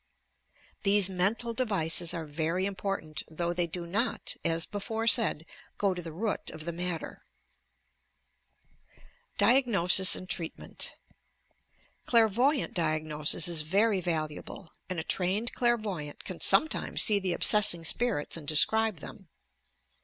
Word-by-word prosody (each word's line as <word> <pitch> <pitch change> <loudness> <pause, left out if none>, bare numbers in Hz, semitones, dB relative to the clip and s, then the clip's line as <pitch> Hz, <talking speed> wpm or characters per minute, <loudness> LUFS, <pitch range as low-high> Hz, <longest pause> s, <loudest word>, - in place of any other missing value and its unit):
Thefie 200 -2 +3
mental 210 +6 -1
devices 180 -8 0
are 165 -2 -5
very 165 +5 -2
important, 195 -5 -4
though 170 +2 -3
they 175 0 -1
do 170 +1 -7
not, 205 +8 -2
as 165 0 0
before 220 +2 -5
said, 225 -9 +3 0.3
go 200 -2 0
to 180 - -7
the 165 -1 -9
root 205 +6 -4
of 155 - -9
the 170 - -3
matter, 175 0 -4 2.2
nlAONOSLS 205 -5 +5
AND 185 - -7
TREATMENT 170 -3 -4 1.1
Clairvoyant 240 +5 +2
diagnosis 155 -1 0
is 170 -3 0
very 195 +5 +1
valuable, 160 +1 -5 0.2
and 185 -3 -3
a - - -4
trained 195 +8 -1
clair\'oyant 210 -11 -2
can 185 -3 -8
sometimes 300 +12 +3
see 210 -3 +4
the 185 -2 -2
obsessing 175 -4 +4
spirits 225 -5 -1
and 160 -3 -7
describe 215 +4 +3
them. 195 -4 -12
185 Hz, 125 wpm, -28 LUFS, 165-215 Hz, 2.2 s, nlAONOSLS